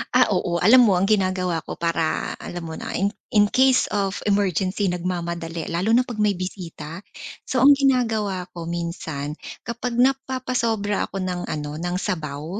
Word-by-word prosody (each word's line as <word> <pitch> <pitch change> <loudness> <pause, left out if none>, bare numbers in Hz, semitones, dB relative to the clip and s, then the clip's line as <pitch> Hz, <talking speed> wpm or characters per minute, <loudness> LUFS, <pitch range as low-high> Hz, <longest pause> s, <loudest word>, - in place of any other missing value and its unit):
Ah, 255 - +6
oo, 175 -1 0
alam 245 +6 +7
mo 200 -5 +4
ang 195 - +2
ginagawa 185 -5 +1
ko - - -7
para 165 -1 -1
alam 175 -1 -6
mo 160 - -6
na - - -6
in 195 - +2 0.2
in 205 -1 +5
case 260 +3 +4
of 195 -1 -1
emergency, 195 -1 +1
nagmamadali, 170 -2 -3
lalo 180 +6 0
na 250 - +5
'pag 240 -4 -7
may 210 -2 +2
bisita. 175 -3 -6 0.5
So 255 -1 +1
ang 285 - +9
ginagawa 225 -9 +1
ko 170 -2 -7
minsan, 165 -4 -4 0.3
kapag 235 +1 -4
napapasobra 250 -5 0
ako 195 -1 -4
ng 180 -1 -2
ano, 150 0 -4
ng 175 +1 -2
sabaw. 160 -1 -3
185 Hz, 160 wpm, -23 LUFS, 170-220 Hz, 0.5 s, ang